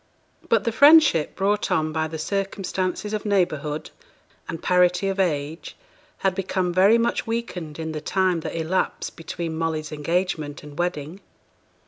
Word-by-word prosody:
But - - +3
the 230 - 0
friendship 285 - +6
brought 205 +2 0
on 155 0 +1
by 160 0 0
the 160 0 -6
circumstances 195 +2 -2
of 215 - -2
neighbourhood 160 -7 -1 0.6
and 165 - -4
parity 180 +2 +2
of 195 0 -3
age 155 -3 -2 0.5
had 190 - +3
become 185 -1 -1
very 195 +5 +5
much 235 0 0
weakened 185 -10 -4
in 160 -1 -4
the 155 -1 -5
time 185 -1 +1
that 160 - -5
elapsed 165 +3 -1
between 165 0 -5
Molly's 160 -1 -2
engagement 155 -1 -2
and 150 -1 -11
wedding. 175 0 -2
180 Hz, 145 wpm, -24 LUFS, 160-195 Hz, 0.6 s, friendship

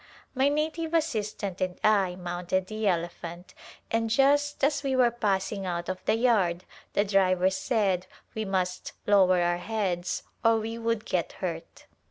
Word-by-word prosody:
My 270 +1 +3
native 315 +2 -1
assistant 215 - -2
and 185 0 -2
I 195 -4 +3
mounted 180 +1 -2
the 215 +2 -3
elephant 175 0 -3 0.4
and 225 0 +1
just 285 +4 +2
as 285 +1 +2
we 270 -2 0
were 250 -2 +4
passing 200 -3 -1
out 175 0 -3
of 185 0 -4
the - - +3
yard 200 -8 +2 0.3
the 205 - +2
driver 190 -2 +3
said 190 -4 0 0.3
we 220 - -2
must 185 -2 -2
lower 190 -3 +5
our 175 0 +1
heads 185 -5 -2 0.2
or 225 0 +5
we 225 +1 -4
would 230 -1 -1
get 175 -3 -1
hurt. 170 -3 -6
200 Hz, 155 wpm, -27 LUFS, 180-230 Hz, 0.4 s, lower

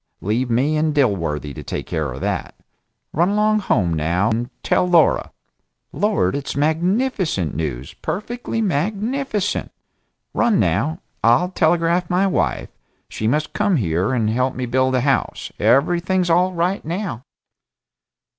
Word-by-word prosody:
Leave 115 +8 -1
me 135 +7 +2
and 155 -1 0
Dilworthy 85 - 0
to - - -8
take - - -5
care 75 -4 -2
of 65 - -7
that. - - -3 0.6
Run 170 +5 +2
along 215 +1 +2
home, 100 - +1
now, 85 +7 +1
and 120 +3 -1
tell 180 - +2
Laura. 170 -2 +4 0.6
Lord, 205 - +1
it's 140 -1 -4
magnificent 165 - 0
news 70 -5 -4
perfectly 230 +3 -3
magnificent! 210 - -1 0.6
Run, 235 -3 +2
now. 110 - 0 0.2
I'll 120 +11 +4
telegraph 170 0 +2
my 180 +2 +2
wife. 190 - 0 0.4
She 110 - -3
must 150 +6 0
come 205 -2 +1
here 90 - 0
and 115 -4 +1
help 125 +4 0
me 130 - -2
build 130 +2 +1
a 125 - +2
house. 135 +1 -1
Everything's 175 +5 +2
all 180 +2 +3
right 180 +2 -1
now!" 165 - -4
150 Hz, 135 wpm, -20 LUFS, 110-185 Hz, 0.6 s, Laura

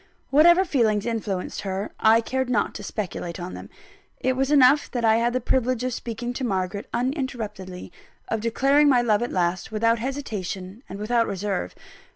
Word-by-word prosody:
Whatever 345 +6 +6
feelings 220 - +1
influenced 215 -5 -3
her, 195 +1 -4
I 225 +1 +5
cared 260 +2 -2
not 215 -5 +1
to - - -7
speculate 185 -4 -5
on 180 +1 -6
them. - - -9 0.5
It 260 - +1
was 270 +1 0
enough 290 0 +5
that 240 -3 -2
I 220 0 +5
had 235 +1 +1
the 255 - 0
privilege 255 0 0
of 255 -1 -1
speaking 240 +1 -4
to 260 - -5
Margaret 195 -3 -2
uninterruptedly; 235 - -4 0.4
of 225 - -2
declaring 275 +6 +3
my 250 -3 +4
love 215 -2 +2
at 240 - -2
last, 175 +2 -1
without 230 +1 +2
hesitation 215 -6 -5
and 195 - -6
without 230 +3 +1
reserve. 195 - -3
230 Hz, 175 wpm, -24 LUFS, 200-255 Hz, 0.5 s, Whatever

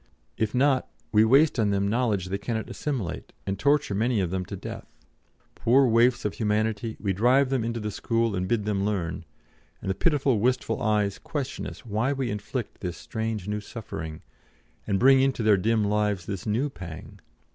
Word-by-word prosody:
If 110 0 -1
not, 130 0 +2 0.2
we 105 0 +5
waste 135 +5 +4
on 105 -2 +3
them 100 0 +1
knowledge 105 -5 0
they 100 +1 -2
cannot 110 +1 -3
assimilate, 125 - -4
and 95 0 -3
torture 145 -6 +2
many 110 +3 +1
of 90 -3 -1
them 95 -1 -2
to - - -6
death. - - -9 0.6
Poor 135 +4 +4
waifs 120 0 +3
of 105 - 0
humanity, 110 +1 -1
we 100 -2 0
drive 130 +7 +3
them 130 -4 +1
into 115 0 -2
the 105 -1 -3
school 115 +1 0
and 90 0 -1
bid 105 0 0
them 100 -2 0
learn; 95 -5 -2 0.5
and 95 - -2
the - - +1
pitiful, 140 - +2
wistful 120 -1 0
eyes 105 -2 +1
question 145 -5 -4
us - - -10
why 115 +5 0
we 130 -3 -2
inflict 105 +3 -5
this 90 -3 -4
strange 110 -4 -4
new 105 0 -2
suffering, 80 -8 -7 0.6
and 100 - +1
bring 135 +4 +6
into 135 -3 +1
their 110 -1 +6
dim 110 +3 +1
lives 105 -3 0
this 100 +1 -5
new 115 +7 +1
pang. 85 - -9
110 Hz, 185 wpm, -26 LUFS, 100-125 Hz, 0.6 s, bring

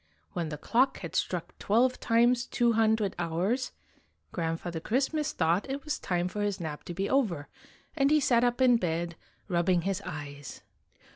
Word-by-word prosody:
When 170 -3 -2
the 150 - -5
clock 255 - +2
had 170 - -6
struck 175 -2 -2
twelve 245 +5 +2
times 240 +1 +3
two 240 -1 +2
hundred 220 -2 +2
hours, 185 +10 -1 0.6
Grandfather 165 0 -3
Christ 260 - 0
mas 305 -2 0
thought 175 +10 +1
it 275 +1 -3
was 300 - -2
time 175 -1 -1
for 205 +3 -4
his 205 -2 -1
nap 155 -3 -5
to 175 - -5
be 195 +2 -1
over, 200 - 0 0.5
and 275 -2 +3
he 305 +1 +5
sat 245 -4 +3
up 245 +1 +1
in 250 -2 +6
bed, 170 -3 -2 0.3
rubbing 175 -1 +2
his 195 +1 -1
eyes. 145 -5 -7
195 Hz, 170 wpm, -29 LUFS, 170-245 Hz, 0.6 s, in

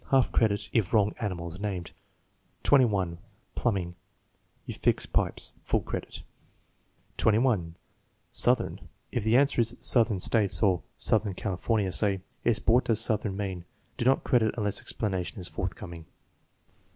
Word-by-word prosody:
Half 135 -2 +3
credit 105 -3 +1
if 110 -3 +1
wrong 105 -1 +3
animal 90 -7 -3
is 85 +3 -9
named. 95 -4 -4 0.7
21. 100 -11 +3 0.3
Plumbing. 95 -7 -1 0.7
"You - - -5
fix - - +1
pipes." - - -1
(Full - - 0
credit.) - - -6 1.0
21* 110 -7 +2 0.6
Southern. - - +2 0.2
If 120 - -2
the 110 +3 +4
answer 140 -2 +3
is 115 +2 0
"Southern 115 -5 +2
States," 100 -2 +3
or 95 -4 +3 0.2
"Southern 105 -3 +1
California," 100 +1 -1
say: 100 -1 0 0.2
"Yes; 120 -3 +3
but 110 - +1
what 125 - +4
does 115 -2 +2
'southern 110 -3 0
9 100 -1 -1
mean?" 90 -2 -7 0.3
Do 120 - -2
not 135 +1 +3
credit 115 -3 +2
unless 105 -3 -1
explanation 95 0 -3
is 90 - -4
forthcoming. 85 -3 -6
105 Hz, 140 wpm, -28 LUFS, 95-115 Hz, 1.0 s, the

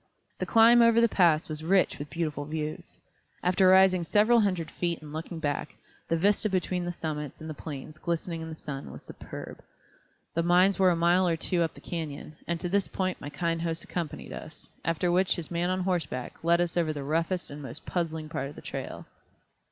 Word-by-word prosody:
The - - -2
climb 230 +1 +7
over 230 0 +6
the 235 - +5
pass 170 -7 +3
was 155 0 -4
rich 185 -1 +2
with 145 0 -6
beautiful 150 -2 -3
views. 155 0 -5 0.5
After 185 +1 +4
rising 185 -1 +6
several 215 +7 +4
hundred 185 -7 0
feet 170 -2 -2
and 150 -1 -11
looking 165 +2 -5
back, 150 -1 -3 0.3
the 165 - +2
vista 205 +4 +3
between 185 -1 -1
the 175 - -2
summits 150 -4 -5
and 160 - -8
the 155 - -4
plains 150 0 -8
glistening 170 -1 -2
in 160 - -6
the 160 - -6
sun 140 -3 -7
was - - -10
superb. - - -9 0.7
The 165 - +1
mines 180 +3 +4
were 190 -1 +6
a 175 - +3
mile 175 +2 +3
or 165 -1 +1
two 175 +2 0
up 165 - 0
the - - -13
canyon, 155 -3 -5
and 170 -1 -1
to - - -1
this 195 +2 +1
point 185 -1 -2
my 145 - -5
kind 165 +1 -1
host 165 -1 -2
accompanied 170 -5 -5
us, - - -10 0.2
after 165 +1 +1
which 185 +1 +3
his 170 -1 -6
man 175 +1 0
on 185 0 0
horseback 175 -9 -2
led 170 +1 +4
us 175 -1 -1
over 170 -3 +1
the 145 -2 -5
roughest 165 +5 -1
and 145 +1 -7
most 135 -4 -7
puzzling 160 -3 -2
part 155 -3 -3
of 145 - -12
the - - -10
trail. - - -6
170 Hz, 210 wpm, -28 LUFS, 155-185 Hz, 0.7 s, climb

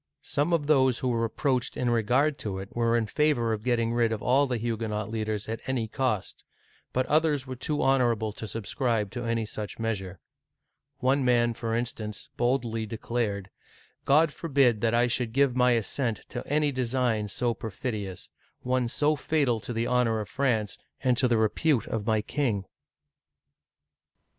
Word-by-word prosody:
Some 145 +4 0
of 165 -4 +2
those 130 -4 +4
who 130 - -1
were 115 -1 +1
approached 125 +2 -1
in 125 -1 +1
regard 125 +6 +2
to 100 -3 -4
it 95 +1 -8
were 115 0 +2
in 115 - +1
favor 120 -3 +1
of 105 - -3
getting 115 -2 +1
rid 120 -1 +2
of 110 -1 -3
all 135 +3 +3
the 125 -2 -1
Huguenot 110 -2 -3
leaders 110 -2 -2
at 115 +1 -4
any 125 -4 -1
cost, 125 -5 -2 0.5
but 130 0 +1
others 150 -3 +2
were 130 -1 -6
too 150 +4 -1
honorable 120 -5 +2
to 110 +1 -7
subscribe 115 0 -1
to 120 -1 -5
any 115 -1 0
such 105 0 -6
measure; 95 -5 -3 0.8
one 135 +1 +2
man, 120 -2 +3
for 115 0 -3
instance, 115 -3 -4
boldly 120 -3 0
declared: 105 -3 -3 0.5
God 150 +2 +4
forbid 135 -9 +2
that 115 0 +2
I 120 +1 +4
should 120 -1 -1
give 135 -1 +3
my 125 -1 +4
assent 115 +1 -1
to 120 - -4
any 150 0 +2
design 125 -4 0
so 120 +4 0
perfidious 105 -4 -5 0.2
— - - -42
one 125 -2 +2
so 150 +5 +1
fatal 140 -5 +1
to 110 - -7
the 115 0 -1
honor 120 -2 +2
of 105 - -4
France 110 -8 0 0.2
and 130 -2 +3
to 130 - +4
the 120 -2 +2
repute 115 +3 +2
of 110 -1 -4
my 110 -2 +2
king 110 -8 -1
120 Hz, 170 wpm, -27 LUFS, 110-130 Hz, 0.8 s, those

